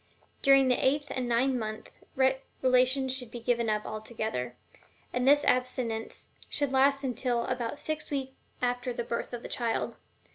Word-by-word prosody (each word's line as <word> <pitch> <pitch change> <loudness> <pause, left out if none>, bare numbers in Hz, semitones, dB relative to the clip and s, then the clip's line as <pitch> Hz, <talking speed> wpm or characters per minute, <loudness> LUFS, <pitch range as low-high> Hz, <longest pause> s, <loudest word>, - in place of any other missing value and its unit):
During 275 -1 +6
the 250 - +2
eighth 285 +2 +1
and 250 -2 -2
ninth 250 +3 +3
months 215 -2 -4 0.7
relations 260 +1 +3
had 250 - -8
best - - -22
be 240 - -6
given 235 -1 +1
up 210 0 0
altogether. 215 - -4 0.6
And 250 +1 0
this 290 +1 +6
abstinence 250 -3 -1 0.2
should 285 -3 +1
last 275 +1 +4
until 245 -2 0
about 240 +3 -2
six 310 +1 -3
weeks 270 -2 -2 0.3
after 245 0 0
the 235 - -3
birth 235 0 -3
of 240 -1 -6
the - - -5
child. 235 -2 -2
250 Hz, 160 wpm, -29 LUFS, 235-265 Hz, 0.7 s, During